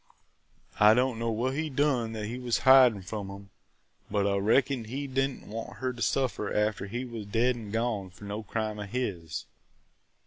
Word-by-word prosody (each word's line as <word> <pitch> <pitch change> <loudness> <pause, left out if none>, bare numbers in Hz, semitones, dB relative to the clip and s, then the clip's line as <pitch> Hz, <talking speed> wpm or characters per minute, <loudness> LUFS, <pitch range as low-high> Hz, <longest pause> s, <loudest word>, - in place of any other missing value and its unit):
I 105 +1 +7
don't 125 -1 +1
know 115 0 -1
what 120 +4 0
he 155 +2 -2
done 130 -5 +1
that 110 -1 -4
he 120 +4 -5
was 125 -2 0
hidin' 130 -7 +7
from 100 +1 -5
'em, 100 0 -10 0.6
but 100 -1 +1
I 100 0 +2
reckoned 115 +4 +2
he 135 +5 -4
did 135 0 +1
n't 135 - -11
want 115 +2 -6
her 130 -1 -2
to 120 - -10
suffer 115 -1 0
after 105 -1 0
he 120 +5 -4
was 115 -4 -7
dead 120 +4 +2
an' 110 -3 -8
gone 110 -3 -1
for 90 +3 -16
no 105 +2 -4
crime 110 0 -3
of 100 -1 -6
his!" 95 -10 -3
115 Hz, 195 wpm, -29 LUFS, 105-125 Hz, 0.6 s, I